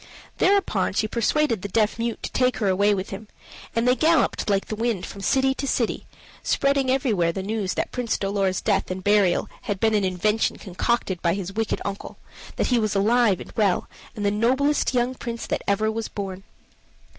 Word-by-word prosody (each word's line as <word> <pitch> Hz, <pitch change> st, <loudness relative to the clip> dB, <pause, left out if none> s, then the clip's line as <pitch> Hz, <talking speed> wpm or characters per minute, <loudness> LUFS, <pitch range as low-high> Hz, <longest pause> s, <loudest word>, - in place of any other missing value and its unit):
Thereupon 370 Hz, -, +2 dB
she 215 Hz, -, +1 dB
persuaded 235 Hz, 0 st, +1 dB
the 200 Hz, -, -4 dB
deaf 215 Hz, +2 st, +1 dB
mute 235 Hz, 0 st, -3 dB
to -, -, -4 dB
take 255 Hz, 0 st, +1 dB
her 210 Hz, -, 0 dB
away 200 Hz, +2 st, +3 dB
with 190 Hz, 0 st, -5 dB
him, 205 Hz, +2 st, -7 dB, 0.5 s
and 230 Hz, +1 st, +1 dB
they 250 Hz, -, +5 dB
galloped 320 Hz, -6 st, +2 dB
like 195 Hz, -1 st, +1 dB
the 215 Hz, -, -4 dB
wind 225 Hz, -4 st, -1 dB
from 200 Hz, -, -9 dB
city 265 Hz, +7 st, +2 dB
to 275 Hz, +1 st, -4 dB
city, 235 Hz, -4 st, -1 dB, 0.3 s
spreading 275 Hz, -1 st, +1 dB
everywhere 220 Hz, -11 st, +2 dB
the 190 Hz, +2 st, -5 dB
news 205 Hz, -2 st, -2 dB
that -, -, -2 dB
Prince 245 Hz, -2 st, -1 dB
Dolor's 195 Hz, -2 st, 0 dB
death 205 Hz, -3 st, 0 dB
and 185 Hz, 0 st, -4 dB
burial 205 Hz, -3 st, +3 dB, 0.2 s
had 200 Hz, -2 st, -1 dB
been 220 Hz, +1 st, +2 dB
an 210 Hz, -2 st, +2 dB
invention 190 Hz, +4 st, 0 dB
concocted 190 Hz, -1 st, -2 dB
by 170 Hz, 0 st, +1 dB
his 195 Hz, -1 st, -5 dB
wicked 225 Hz, +1 st, -1 dB
uncle 200 Hz, 0 st, -5 dB, 0.4 s
that -, -, 0 dB
he 240 Hz, -, +4 dB
was 215 Hz, -2 st, -1 dB
alive 215 Hz, -1 st, +3 dB
and -, -, -9 dB
well, 205 Hz, -5 st, +1 dB, 0.3 s
and 205 Hz, -2 st, -3 dB
the 200 Hz, -, +3 dB
noblest 260 Hz, +6 st, +1 dB
young 245 Hz, +1 st, +1 dB
prince 235 Hz, -2 st, -6 dB
that -, -, -2 dB
ever 215 Hz, +2 st, +1 dB
was 225 Hz, 0 st, -3 dB
born. 195 Hz, -2 st, -6 dB
215 Hz, 195 wpm, -24 LUFS, 195-240 Hz, 0.5 s, they